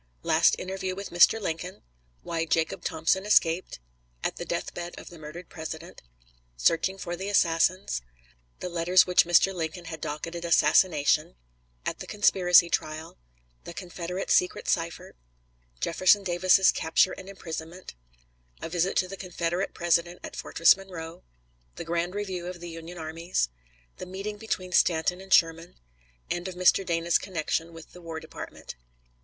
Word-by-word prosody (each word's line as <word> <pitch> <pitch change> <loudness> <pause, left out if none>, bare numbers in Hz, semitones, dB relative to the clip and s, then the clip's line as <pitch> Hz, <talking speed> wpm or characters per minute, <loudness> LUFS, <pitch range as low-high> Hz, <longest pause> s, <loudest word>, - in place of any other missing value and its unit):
Last - - +4
interview 190 0 -4
with 200 +1 -7
Mr. 175 +6 +5
Lincoln 180 -2 -5 0.4
Why 165 -1 -2
Jacob 160 0 0
Thompson 160 +4 0
escaped 180 - +2 0.4
At - - -2
the - - -5
deathbed 175 0 -4
of - - -11
the 170 - -12
murdered 155 +4 -9
President 160 +1 -8 0.6
Searching 165 - +2
for 175 -2 -4
the 190 +3 -5
assassins 170 - +2 0.6
The 180 - -3
letters 175 +1 +4
which 180 -1 +4
Mr. 175 +3 +4
Lincoln 170 0 -4
had 160 -1 -7
docketed 165 +3 -5
"Assassination" 155 -1 +3 0.5
At - - -3
the - - -8
conspiracy 180 -4 +5
trial 155 - -3 0.4
The 170 - -9
Confederate 180 0 -5
secret 180 - +2
cipher 165 -1 -2 0.7
Jefferson 185 - +3
Davis's 185 +1 +4
capture 165 +3 +2
and 190 - -9
imprisonment 170 -1 -8 0.7
A - - -6
visit 175 +2 0
to 185 - +2
the 195 +1 -8
Confederate 175 0 -3
President 175 0 +1
at - - -8
Fortress 165 - +4
Monroe 180 -4 -9 0.5
The - - -7
grand 170 +2 -2
review 190 -4 -4
of 180 -1 -7
the 170 0 -8
Union 165 +2 -9
armies 160 - -2 0.5
The 185 - -7
meeting 195 +3 -5
between 195 -4 -4
Stanton 175 +1 +2
and 190 0 -14
Sherman 165 0 +3 0.6
End 175 +1 -2
of 185 - -6
Mr. 185 +2 +4
Dana's 170 -1 +1
connection 165 -2 -2
with 165 -1 -13
the 180 - -13
War 165 -1 -6
Department. - - -9
175 Hz, 150 wpm, -27 LUFS, 165-185 Hz, 0.7 s, Mr